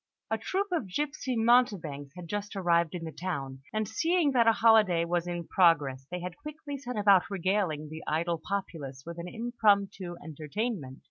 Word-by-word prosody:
A 220 - +2
troupe 385 - -2
of 320 - -1
gipsy 275 -1 -2
mountebanks 200 - +2
had 180 -2 -8
just 205 +2 -4
arrived 170 -2 +2
in 170 - -5
the 160 - -5
town, 140 -7 -5
and 215 -1 -1
seeing 325 - +2
that 240 -3 +3
a - - +8
holiday 215 -7 +4
was 175 0 -1
in 175 -1 -4
progress, 145 -8 +3
they 180 0 -4
had 180 0 -6
quickly 300 -1 -7
set 250 -4 -6
about 200 -3 +5
regaling 185 -5 0
the 160 +1 -7
idle 165 +1 0
populace 150 -9 -4
with 170 0 -7
an 170 - -5
impromptu 205 -5 +1
entertainment. 160 - -4
185 Hz, 175 wpm, -29 LUFS, 165-225 Hz, -, a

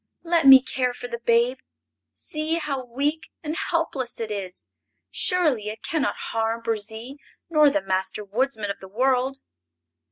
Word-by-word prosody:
Let 335 -4 +2
me 265 -1 +10
care 250 -2 -1
for 245 - -7
the 235 -1 -5
babe! 235 +2 +2 0.5
See 310 +1 -3
how 285 -5 -2
weak 285 +6 -2
and 310 +1 -3
helpless 320 -8 -2
it 225 -2 -4
is. 190 -3 -6 0.5
Surely 300 - 0
it 215 +1 -8
can 315 -2 -1
not - - 0 0.2
harm 225 +1 -1
Burzee 225 +4 -3 0.3
nor 305 -2 +6
the 300 +1 0
Master 190 +2 -1
Woodsman 220 -1 -1
of - - -7
the 190 - -10
World!" 255 +5 +1
250 Hz, 155 wpm, -24 LUFS, 225-295 Hz, 0.5 s, me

